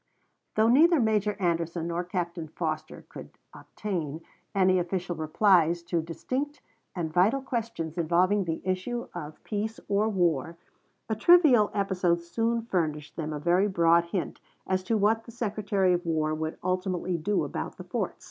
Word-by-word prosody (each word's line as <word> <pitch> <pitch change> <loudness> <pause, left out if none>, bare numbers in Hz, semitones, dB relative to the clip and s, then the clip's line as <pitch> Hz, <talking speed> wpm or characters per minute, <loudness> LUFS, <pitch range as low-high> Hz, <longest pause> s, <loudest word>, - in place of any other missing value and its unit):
Though 220 +1 +4
neither 315 +7 +5
Major 215 -2 +1
Anderson 170 -2 -1
nor 170 +1 -1
Captain 175 -2 -4
Foster 155 0 -4
could - - -11 0.2
obtain 165 -7 -5 0.3
any 185 -1 +4
official 175 0 -2
replies 170 +1 +3
to 170 -1 -1
distinct 260 - -4 0.4
and 165 -3 -3
vital 200 +10 +3
questions 220 - -4
involving 180 +4 +2
the 165 -1 -3
issue 190 +6 -2
of 155 -3 -8
peace 220 +1 -3
or 205 +2 +2
war, 170 -5 0 0.5
a 220 - -1
trivial 260 - +6
episode 185 -4 +1
soon 230 +7 -1
furnished 155 -8 -2
them 155 -2 -4
a 150 - -3
very 175 +6 +3
broad 170 -3 +3
hint 170 +1 -4 0.3
as 185 0 0
to 225 +3 +1
what 220 +2 +2
the 230 - -10
Secretary 205 -5 0
of 175 0 -1
War 155 -2 0
would 155 0 -3
ultimately 185 -1 -1
do 200 +6 0
about - - -5
the - - -8
forts. - - -3
185 Hz, 155 wpm, -27 LUFS, 170-210 Hz, 0.5 s, trivial